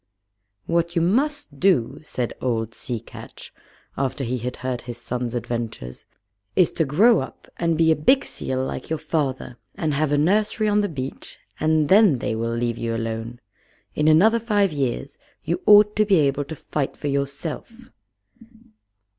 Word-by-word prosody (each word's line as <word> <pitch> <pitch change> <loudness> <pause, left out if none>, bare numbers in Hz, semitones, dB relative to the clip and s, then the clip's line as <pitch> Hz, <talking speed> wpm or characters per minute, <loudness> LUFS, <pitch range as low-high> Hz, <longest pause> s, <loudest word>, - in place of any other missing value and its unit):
"What 170 +1 0
you 170 - +2
must 245 - 0
do," 145 -8 +2
said 125 -6 -4
old 115 -3 -1
Sea 120 -4 -5
Catch, 115 - -11 0.4
after 135 +1 -2
he 125 +1 -2
had 125 +2 -4
heard 125 -2 -2
his 120 -1 -7
son's 120 0 -4
adventures, 115 - -5 0.5
"is 180 - +4
to 160 - 0
grow 210 - +4
up - - -8
and 165 -2 0
be 160 0 +4
a - - +4
big 260 - +3
seal 130 0 -3
like 130 - -6
your 160 - -1
father, 140 -5 -3 0.2
and 160 -6 -1
have 145 +1 0
a 145 - +3
nursery 210 +7 +2
on 210 0 +3
the 205 - -1
beach, 135 -4 -7 0.2
and 155 -1 +2
then 195 - +5
they 115 - -2
will 115 +1 -2
leave 120 0 -2
you 115 0 -2
alone. 115 +2 -4 0.5
In 150 - +1
another 205 +9 +5
five 205 -4 +1
years 140 -1 -3 0.2
you 170 +3 -2
ought 210 0 +7
to 215 - +5
be 200 -2 +4
able 145 -3 +2
to 160 - -7
fight 145 -1 -4
for 145 - -4
yourself." 145 - -4
145 Hz, 170 wpm, -23 LUFS, 125-175 Hz, 0.5 s, ought